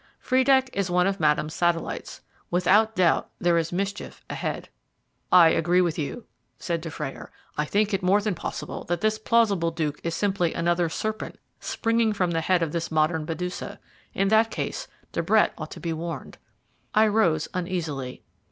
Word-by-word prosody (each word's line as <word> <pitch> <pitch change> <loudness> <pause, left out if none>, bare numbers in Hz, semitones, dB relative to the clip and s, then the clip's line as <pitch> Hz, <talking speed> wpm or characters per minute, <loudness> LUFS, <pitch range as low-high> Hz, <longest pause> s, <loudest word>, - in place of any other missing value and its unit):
"Friedeck 260 0 +3
is 195 -2 -1
one 180 0 +3
of 195 0 0
Madame's 150 0 +1
satellites. 175 -1 -1 0.3
Without 210 +5 +3
doubt, 180 -3 +2
there 175 -1 +2
is 165 0 -3
mischief 200 +3 -4
ahead." - - -4 0.6
"I 175 -3 +8
agree 175 +3 +2
with 170 -3 +1
you," 155 +10 -4 0.3
said 170 -2 -2
Dufrayer; 160 -4 -6 0.2
"I 150 - 0
think 205 +5 +1
it 195 - +1
more 185 +3 +4
than 210 -1 -1
possible 170 - -5
that 175 0 -2
this 215 0 +1
plausible 215 -7 +2
Duke 155 -3 -3
is 170 0 -2
simply 190 -4 0
another 170 0 +1
serpent 215 +6 -4 0.2
springing 230 -1 +1
from 180 -4 0
the 165 -1 0
head 175 +1 +2
of 160 - -2
this 170 0 -2
modern 155 0 +1
Medusa. 180 +3 -5 0.4
In 195 0 +2
that 220 +1 +4
case, - - -4 0.2
De - - -1
Brett - - +3
ought - - -7
to - - -9
be 170 -2 -3
warned." 165 +1 -6 0.6
I 215 +1 +6
rose 205 -8 +2
uneasily. 165 -8 -4
175 Hz, 170 wpm, -25 LUFS, 165-205 Hz, 0.6 s, I